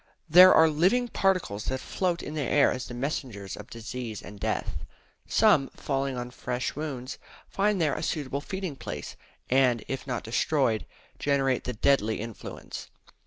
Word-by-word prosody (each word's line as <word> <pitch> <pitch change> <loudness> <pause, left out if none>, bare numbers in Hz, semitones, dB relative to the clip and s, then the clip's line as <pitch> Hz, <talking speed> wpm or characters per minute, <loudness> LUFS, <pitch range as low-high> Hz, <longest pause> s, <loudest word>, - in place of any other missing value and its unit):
There 180 +3 +9
are 160 - +7
living 185 +11 +2
particles 185 - 0
that 130 - -2
float 175 +2 -2
in 150 - -6
the 155 - -2
air 140 +1 +4
as 130 0 -4
the 120 - -7
messengers 120 -7 -4
of - - -11
disease 115 -1 -6
and 105 0 -10
death. 80 - -2 0.5
Some, 135 - +4
falling 135 -2 -2
on 125 0 -5
fresh 125 0 -3
wounds, 135 -4 -5 0.3
find 205 0 +1
there 155 -4 +2
a - - -3
suitable 145 -3 -2
feeding 190 -2 -4
place; - - -6 0.3
and, 125 -3 +3
if 135 +1 -4
not 125 -2 -2
destroyed, 115 -1 +1 0.3
generate 135 -3 +1
the 125 - -2
deadly 110 -2 +2
influence. 115 0 -7
135 Hz, 160 wpm, -27 LUFS, 120-155 Hz, 0.5 s, There